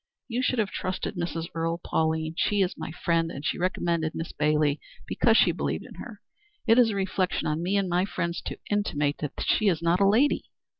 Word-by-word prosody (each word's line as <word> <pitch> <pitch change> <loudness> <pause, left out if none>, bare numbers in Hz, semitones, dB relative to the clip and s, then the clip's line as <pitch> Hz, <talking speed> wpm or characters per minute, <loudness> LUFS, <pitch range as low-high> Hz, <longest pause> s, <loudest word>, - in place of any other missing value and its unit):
You 245 +1 -1
should 255 0 +1
have 210 -4 0
trusted 185 +2 -3
Mrs. 170 -2 -3
Earle, 165 +1 -1
Pauline, 160 0 0
She 205 +3 +2
is 180 - -1
my 160 0 -6
friend, 165 0 0
and 145 -1 -7
she - - -1
recommended 170 -3 0
Miss 165 - -4
Bailey 150 -1 +1 0.3
because - - +3
she - - +5
believed - - -3
in - - -11
her. - - -9 0.4
It 230 +1 +5
is 240 -2 +6
a 210 - -2
reflection 190 -1 -1
on 155 +2 -1
me 190 +4 +1
and 195 -1 +1
my 180 +1 +1
friends 170 -3 -3
to - - -5
intimate 150 -9 0
that 150 -2 -4
she 215 - +2
is 170 -5 +3
not 170 +2 +2
a 200 - +5
lady." 255 +8 +3
175 Hz, 210 wpm, -27 LUFS, 160-200 Hz, 0.4 s, is